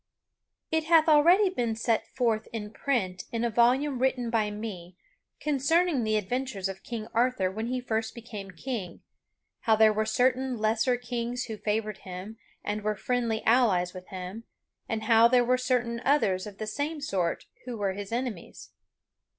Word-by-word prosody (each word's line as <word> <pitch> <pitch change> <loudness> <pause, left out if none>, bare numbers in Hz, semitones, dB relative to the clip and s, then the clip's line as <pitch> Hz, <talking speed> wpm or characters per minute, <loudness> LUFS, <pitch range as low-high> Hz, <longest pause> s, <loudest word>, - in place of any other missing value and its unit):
It 320 0 +1
hath 325 -1 +5
already 340 +7 +6
been 235 -8 -1
set 225 0 0
forth 230 -4 0
in 210 -2 -5
print 210 -9 -1
in 230 0 -1
a 235 - 0
volume 250 +4 +3
written 255 -2 0
by 220 -2 +1
me 195 -5 -7 0.4
concerning 300 0 +2
the 215 0 +1
adventures 215 -1 -2
of 190 0 -7
King 225 -2 -6
Arthur 235 -5 +2
when 220 +4 -4
he 255 +1 -1
first 225 -2 -2
became 215 -4 -8
king, 190 -1 -5 0.6
how 220 - +3
there 215 0 +5
were 215 +1 0
certain 255 +2 +1
lesser 225 +3 +2
kings 245 0 -3
who 225 - -5
favored 215 0 -2
him 190 +4 -8 0.3
and 210 +1 -2
were 210 0 -1
friendly 235 0 -1
allies 210 -7 +3
with 185 -1 -10
him, 190 +4 -7 0.4
and 220 -1 -2
how 225 +1 +6
there 245 0 +4
were 250 +1 +3
certain 240 -2 0
others 200 -10 +2
of 200 -1 -10
the 215 - -4
same 290 +8 -3
sort 190 - -1 0.2
who 245 -2 -5
were 200 -2 -1
his 200 +1 -7
enemies. 235 -6 -5
230 Hz, 165 wpm, -28 LUFS, 210-250 Hz, 0.6 s, already